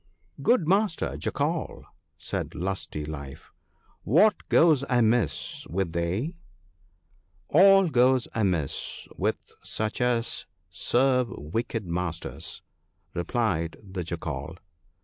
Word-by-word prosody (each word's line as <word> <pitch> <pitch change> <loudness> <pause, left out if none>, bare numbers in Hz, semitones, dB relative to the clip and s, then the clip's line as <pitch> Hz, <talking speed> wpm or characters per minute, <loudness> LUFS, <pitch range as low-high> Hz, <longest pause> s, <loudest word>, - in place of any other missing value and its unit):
' 85 +11 -16
Good 240 -11 +4
master 195 -1 +1
Jackal,' 155 +3 -2 0.3
said - - -4
Lusty 90 -5 -3
life, 70 -3 -8 0.3
' - - -37 0.2
what 215 - +1
goes 155 -5 +5
amiss 115 - +1
with 90 0 -1
thee? 90 - -1 0.6
' 80 -2 -39
'All 195 +3 +7
goes 130 -3 +3
amiss 90 -9 -1
with - - -2
such 110 +2 -2
as 120 -1 0 0.2
serve 125 +7 +2
wicked 110 +4 -3
masters,' 85 -1 -4 0.5
replied 85 -3 -1
the 95 -2 -5
Jackal. 80 -2 -5
105 Hz, 105 wpm, -27 LUFS, 85-130 Hz, 0.6 s, All